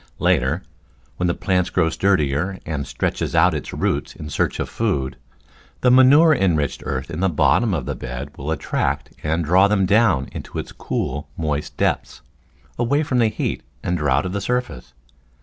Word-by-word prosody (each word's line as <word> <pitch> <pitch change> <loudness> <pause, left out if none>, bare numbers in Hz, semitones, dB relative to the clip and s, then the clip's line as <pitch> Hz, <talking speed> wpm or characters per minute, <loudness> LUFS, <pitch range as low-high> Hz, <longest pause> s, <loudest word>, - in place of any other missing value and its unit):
Later, 85 -2 +1 0.5
when 90 - 0
the 85 - 0
plant 90 -2 0
grows 80 0 +2
sturdier 90 -1 +1
and 75 -4 -3
stretches - - -2
out 85 +2 +5
its 75 - -4
roots - - -2
in 75 -1 -8
search - - -1
of - - -1
food, 65 -2 -1 0.7
the 125 - +4
manure 140 +6 +7
enriched 80 - 0
earth 65 +3 -3
in 80 - -4
the 95 +1 +2
bottom 80 - +2
of 75 - -3
the - - -2
bed 65 +1 -7
will 70 +3 -6
attract 80 -2 -1
and 80 +2 -1
draw 95 +5 +5
them 100 -2 +2
down 100 - +3
into - - -7
its - - -5
cool, 75 +2 -4
moist 75 -2 -3
depths, - - -1 0.6
away 140 +6 +2
from 130 -4 0
the 115 - +4
heat 110 - -2 0.2
and 90 0 -1
drought 75 0 +1
of 90 - -3
the 100 - -2
surface. 85 - -3
85 Hz, 175 wpm, -21 LUFS, 75-100 Hz, 0.7 s, manure